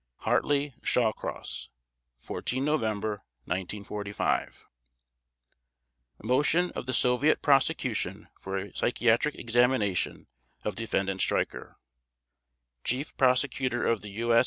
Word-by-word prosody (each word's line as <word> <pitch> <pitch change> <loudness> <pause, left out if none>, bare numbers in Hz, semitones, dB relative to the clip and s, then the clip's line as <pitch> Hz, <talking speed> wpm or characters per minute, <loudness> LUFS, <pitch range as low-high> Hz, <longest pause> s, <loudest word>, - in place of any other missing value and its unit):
/s/ - - -24
HARTLEY 145 -1 +1
SHAWCROSS 85 - -1 0.5
14 130 - -2
November 110 -8 0 0.2
1945 100 +2 -2 1.6
MOTION 150 +9 +2
OF - - -6
THE 130 - -1
SOVIET 125 +5 +3
PROSECUTION 130 - +1
FOR 95 0 -4
A 100 +1 -5
PSYCHIATRIC 120 +4 +2
EXAMINATION 115 -5 +1 0.4
OF 105 - -2
DEFENDANT 95 -4 -1
STREICHER - - -1 1.1
CHIEF 130 +5 -1
PROSECUTOR 130 -1 +2
OF 115 -3 +1
THE 105 - -7
U. 115 +3 0
120 Hz, 95 wpm, -28 LUFS, 105-130 Hz, 1.6 s, SOVIET